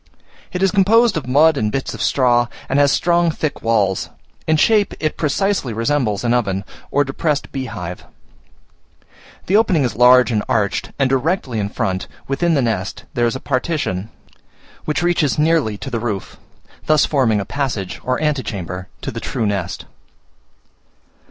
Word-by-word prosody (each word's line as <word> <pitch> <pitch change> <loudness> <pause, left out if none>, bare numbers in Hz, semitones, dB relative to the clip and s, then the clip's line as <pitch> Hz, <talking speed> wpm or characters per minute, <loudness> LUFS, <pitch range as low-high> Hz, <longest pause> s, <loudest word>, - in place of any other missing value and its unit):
It 180 +1 -2
is 195 - +3
composed 215 +4 +4
of 150 -6 -3
mud 150 +4 +4
and 105 -4 0
bits 135 +2 -3
of - - -7
straw, 120 -3 +3 0.2
and 135 - +1
has 140 -1 +4
strong 170 +1 +2
thick 155 -2 -3
walls: 105 -4 +1 0.4
in 160 0 +3
shape 210 +4 +3
it 155 - -1
precisely 160 - 0
resembles 115 -2 0
an 120 0 +2
oven, 100 -5 0 0.3
or 145 - +2
depressed 145 +2 -2
beehive. 90 -10 -6 1.4
The 190 - +1
opening 200 -9 +3
is 125 - -1
large 125 +1 +6
and 105 -2 0
arched, 100 -2 0
and 135 - +2
directly 135 - 0
in 100 -1 -2
front, 95 -4 -2 0.2
within 160 +5 +1
the 140 - +2
nest, 105 -5 -2
there 120 -1 +2
is 115 - -2
a - - -4
partition, 130 - -2 0.8
which 155 +3 -1
reaches 175 -5 +1
nearly 150 -9 +2
to 135 - -7
the 115 - -1
roof, 110 -4 -4 0.5
thus 155 -1 +4
forming 125 -8 +2
a 100 - -3
passage 120 -10 -3
or 130 0 -1
antechamber 95 - -3 0.2
to - - -3
the - - -5
true 110 - -2
nest. 95 -3 -3
130 Hz, 160 wpm, -19 LUFS, 110-155 Hz, 1.4 s, large